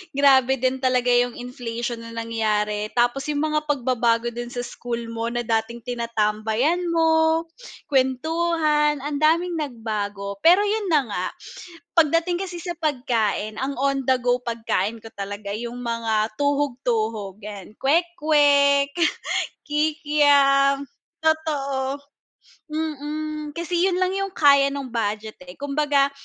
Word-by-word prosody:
grabe 265 -2 +5
din 260 +1 0
talaga 255 -1 +2
yung 245 0 +2
inflation 240 -1 -5
na 230 0 -9
nangyari. 215 -2 -1
Tapos 245 +4 +1
yung 295 0 -1
mga 305 0 -1
pagbabago 240 -4 +1
din 240 +1 -6
sa 245 0 -5
school 235 -1 -5
mo 230 0 -3
na 240 0 -2
dating 225 +1 -2
tinatambayan 235 +7 0
mo, 325 -1 +3 0.5
kwentuhan, 300 +2 +1
ang 290 -1 -3
daming 330 +2 +2
nagbago. 210 -6 -4
Pero 360 - +6
yun 415 -1 -1
na 300 -5 +3
nga, 180 -2 -2 0.7
pagdating 330 +2 +3
kasi 350 -3 -7
sa 355 - -3
pagkain 235 -8 -1
ang 275 +1 -2
on 275 0 +1
the 260 - +5
go 245 0 +2
pagkain 230 -2 -1
ko 225 - -10
talaga 200 0 -5
yung 235 +2 -5
mga 225 -2 -1
tuhog-tuhog 240 -8 -1
yan 210 -1 -9
kwek-kwek, 290 -3 +3 0.8
kikiam. 290 -2 +3 0.4
Totoo. 280 -4 0 0.7
Mm, 305 0 -4
kasi 345 +2 0
yun 375 - +1
lang 370 - +2
yung 390 -1 -3
kaya 280 -2 +5
nung 270 -3 -5
budget 215 -1 -3
eh, 180 - -10
kumbaga, 285 +1 +1
270 Hz, 125 wpm, -23 LUFS, 230-300 Hz, 0.8 s, Pero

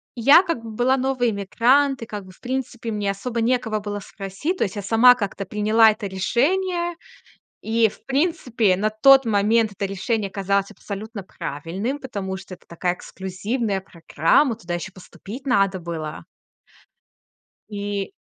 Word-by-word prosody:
я 280 +10 +7
как 335 -10 -2
бы 225 - -7
была 245 +4 +1
новый 255 -3 +1
эмигрант, 245 +6 +2
и - - -5
как 205 -3 -7
бы, 185 - -13
в - - -21
принципе, 245 -2 -4
мне 205 -2 -1
особо 230 +4 -3
некого 225 -2 0
было 205 0 -5
спросить. 195 - -4
То - - +1
есть 190 - -6
я 205 - -4
сама 235 +4 +6
как-то 200 -2 -4
приняла 215 +3 +4
это 210 -1 -2
решение. 345 - 0 0.7
И, 225 0 +3
в - - -16
принципе, 265 - +1
на 210 +3 +1
тот 270 +5 +6
момент 215 +1 +2
это 200 +1 -4
решение 200 +1 -2
казалось 200 0 0
абсолютно 205 0 -7
правильным, 175 - -4
потому 200 -8 -5
что 190 0 -9
это - - -22
такая 175 +1 -1
эксклюзивная 195 +4 -3
программа, 170 - +1
туда 175 -6 -6
ещё 175 +2 -5
поступить 220 +7 -11
надо 195 -5 +2
было. 160 -3 -5 1.5
И 205 - -3
215 Hz, 155 wpm, -22 LUFS, 195-245 Hz, 1.5 s, я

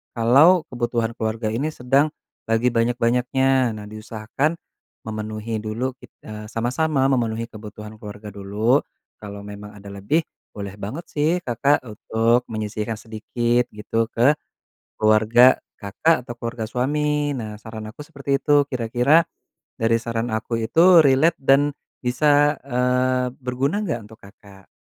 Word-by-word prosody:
kalau 140 +10 +6
kebutuhan 120 -1 -1
keluarga 110 0 -2
ini 130 +7 -1
sedang 135 +5 +1 0.3
lagi 115 +2 +2
banyak-banyaknya. 125 +2 +1
Nah, 105 -1 -8
diusahakan 110 +8 -3 0.5
memenuhi 110 0 -4
dulu, 115 +5 -3
kit - - -14 0.2
eee, 105 0 -8
sama-sama 130 +6 0
memenuhi 115 -3 0
kebutuhan 105 0 -10
keluarga 105 0 -9
dulu, 105 +7 +1 0.4
kalau 100 -1 -8
memang 105 0 -9
ada 100 0 -13
lebih 100 +11 0 0.4
boleh 100 -1 -6
banget 110 - -6
sih, 150 +2 +1
Kakak 130 +4 +2
untuk 115 +3 +1
menyisihkan 110 0 -3
sedikit 120 +2 -1
gitu, 115 +2 -1
ke 130 +6 +4 0.6
keluarga 110 +4 +5 0.2
Kakak 120 +10 +1
atau 120 - -6
keluarga 115 -1 -4
suami. 150 +3 0
Nah, 110 -3 -6
saran 110 0 -8
aku - - -33
seperti 140 -3 -2
itu. 145 0 +4
Kira-kira 125 +6 +3 0.6
dari 115 0 +3
saran 115 0 -3
aku 110 +1 -2
itu 170 +9 +6
relate 145 +5 +4
dan 140 +2 +4 0.3
bisa, 145 +4 +3
eee, 125 0 +1
berguna 135 +8 -1
nggak 155 - -2
untuk 110 +1 -15
Kakak? 100 -1 -17
120 Hz, 130 wpm, -22 LUFS, 110-135 Hz, 0.6 s, kalau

